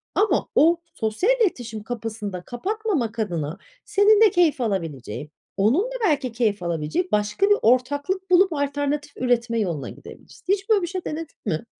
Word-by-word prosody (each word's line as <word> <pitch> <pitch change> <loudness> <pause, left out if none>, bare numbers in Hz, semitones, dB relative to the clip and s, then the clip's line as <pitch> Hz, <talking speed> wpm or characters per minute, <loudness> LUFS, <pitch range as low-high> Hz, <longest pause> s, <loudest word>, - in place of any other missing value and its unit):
ama 425 +1 +2
o 335 +2 +4
sosyal 220 - +1
iletişim 235 - -1
kapısını 225 -3 -5
da 180 - -5
kapatmamak 275 - -2
adına 170 -8 -2 0.3
senin 415 +1 +4
de 440 - +8
keyif 345 -8 +2
alabileceğin, 155 - -3 0.3
onun 225 - +3
da - - -6
belki 285 -8 +1
keyif 220 -5 0
alabilecek 170 - -2
başka 210 - +1
bir 410 - +5
ortaklık 285 - +1
bulup 365 0 +5
alternatif 285 0 -2
üretme 240 -2 +1
yoluna 170 -10 -2
gidebilirsin. - - -14
Hiç 395 +2 -3
böyle 425 -3 +4
bir 345 - -2
şey 370 0 -5
denedin 315 0 -5
mi? 165 -2 -2
255 Hz, 160 wpm, -23 LUFS, -, 0.3 s, de